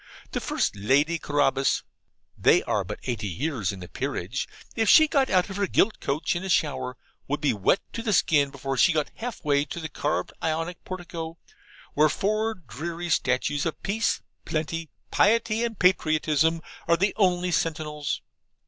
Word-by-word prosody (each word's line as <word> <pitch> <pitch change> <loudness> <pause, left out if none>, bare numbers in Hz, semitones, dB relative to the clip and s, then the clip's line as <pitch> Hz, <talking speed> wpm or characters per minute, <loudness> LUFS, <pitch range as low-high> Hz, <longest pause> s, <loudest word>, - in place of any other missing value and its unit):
The - - -1
first - - -1
Lady 140 +11 +2
Carabas 145 -2 +1 0.5
(they - - +4
are - - 0
but - - -6
eighty 115 -5 -2
years 115 - -2
in 95 -2 -9
the 90 - -7
peerage), 100 - -3 0.3
if 225 -2 +2
she 315 -1 +8
got 275 -2 +2
out 185 -1 +3
of 190 - -5
her 200 -1 +1
gilt 215 +4 +2
coach 150 +5 -1
in 175 - -3
a 190 - -4
shower, 140 -7 0 0.3
would 145 +2 -1
be 150 - +2
wet 105 - +2
to 230 - -3
the 225 -2 -1
skin 145 -6 +3
before 135 -1 -4
she 180 +7 +5
got 155 -2 0
half 235 -7 -6
way 145 -1 +3
to 160 - -6
the 160 -1 -5
carved 145 +2 -2
Ionic 165 +2 -2
portico, 170 -3 -6 0.6
where 150 +1 +4
four 215 +6 0
dreary 170 - -6
statues 145 0 +1
of 165 - -3
Peace, 220 +3 0 0.2
Plenty, 160 +1 -3 0.2
Piety 225 +1 +3
and 230 -3 -2
Patriotism, 160 -3 +2 0.3
are 170 - +4
the 195 +3 +1
only 180 -3 +2
sentinels. 155 -3 -2
160 Hz, 170 wpm, -26 LUFS, 145-185 Hz, 0.6 s, she